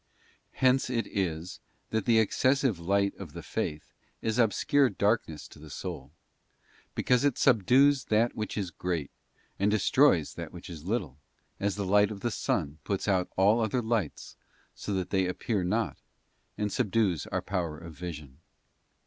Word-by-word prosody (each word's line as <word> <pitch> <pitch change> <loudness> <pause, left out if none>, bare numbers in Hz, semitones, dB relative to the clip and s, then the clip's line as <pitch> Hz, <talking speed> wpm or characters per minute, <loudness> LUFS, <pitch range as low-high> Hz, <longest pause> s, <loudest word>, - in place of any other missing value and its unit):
Hence 130 0 +3
it 120 -2 0
is 90 -3 -3 0.3
that 110 -2 0
the 115 -2 +4
excessive 130 - +2
light 100 +3 +1
of 90 -7 -9
the - - -8
faith 75 0 -4 0.3
is 110 +2 -1
obscure 125 +5 +3
darkness 100 -9 0
to - - -15
the 75 0 -12
soul, 70 - -6 0.8
because 125 0 +2
it 145 -4 +2
subdues 130 +3 +4
that 110 +2 +2
which 110 -1 -4
is 95 -4 -2
great, 85 -4 -3 0.5
and 100 +2 +3
des 110 - +3
troys 105 - +3
that - - -7
which - - -10
is 80 -2 -9
little, 90 - -2 0.4
as 100 -1 0
the 100 -1 -3
light 105 +2 +4
of 105 -2 -7
the 120 - -1
sun 75 -6 -2
puts 100 +5 -2
out 95 -3 +1
all 100 +5 +5
other 110 +3 0
lights 110 -8 -2 0.4
so - - -6
that 95 -2 -3
they 95 -2 +2
appear 95 +2 -1
not, 95 - -1 0.6
and 105 -1 -1
subdues 105 - +1
our - - -2
power 85 -5 -2
of 85 0 -10
vision. 75 -5 -8
100 Hz, 165 wpm, -29 LUFS, 85-115 Hz, 0.8 s, all